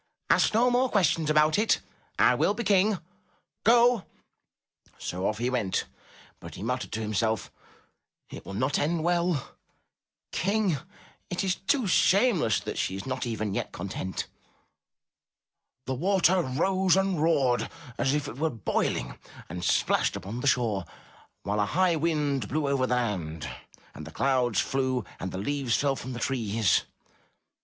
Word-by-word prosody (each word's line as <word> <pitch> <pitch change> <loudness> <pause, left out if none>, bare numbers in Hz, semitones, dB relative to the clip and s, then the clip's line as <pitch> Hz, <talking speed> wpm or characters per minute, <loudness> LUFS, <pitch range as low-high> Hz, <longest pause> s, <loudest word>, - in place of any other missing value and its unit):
' - - -50
Ask - - +3
no 245 +2 +4
more 250 +1 +2
questions 165 -7 +2
about 155 +3 +4
it! 220 - +3 0.4
I - - +5
will 205 - +1
be 235 - -3
King. 200 0 +3 0.7
Go 235 -1 +5 0.5
!" - - -35
So 90 +2 -3
off 105 - -1
he 120 +3 -1
went 110 -7 0 0.5
but - - -10
he - - -7
muttered 125 +3 -2
to 110 - -2
himself, 110 0 -1 0.8
''It - - -8
will 95 - -7
not 130 +6 0
end 160 +2 0
well! 175 -4 0 0.8
King! 200 -4 +1 0.5
It 180 +1 -2
is 190 -2 +1
too 240 +6 0
shameless 190 - +3
that - - -5
she 95 - -1
is 95 - -6
not 130 -1 -3
even 110 -3 -2
yet - - -3
content." 95 0 -4 1.6
The 130 - -2
water 185 +4 +3
rose 185 +6 +2
and 195 -4 +1
roared 135 -7 +2 0.3
as 135 - +2
though - - -5
it 130 - -11
were 160 +1 +1
boiling, 115 -8 -2 0.3
and 90 +2 -6
splashed - - +2
upon 105 +6 -6
the 140 - -2
shore, 115 -7 +1 0.6
while 105 +1 -1
a 105 - +3
high 185 -2 +4
wind 150 -7 0
blew 150 +3 -1
over 135 -2 +1
the 125 - +1
land, 90 -10 -2 0.5
and 80 - -9
the - - -9
clouds 125 - +1
flew 130 -4 0
and 95 - -4
the - - -5
leaves 130 +3 0
fell 140 -1 +1
from 130 -1 -6
the 120 - -5
trees. 115 -5 +1
135 Hz, 160 wpm, -27 LUFS, 110-180 Hz, 1.6 s, I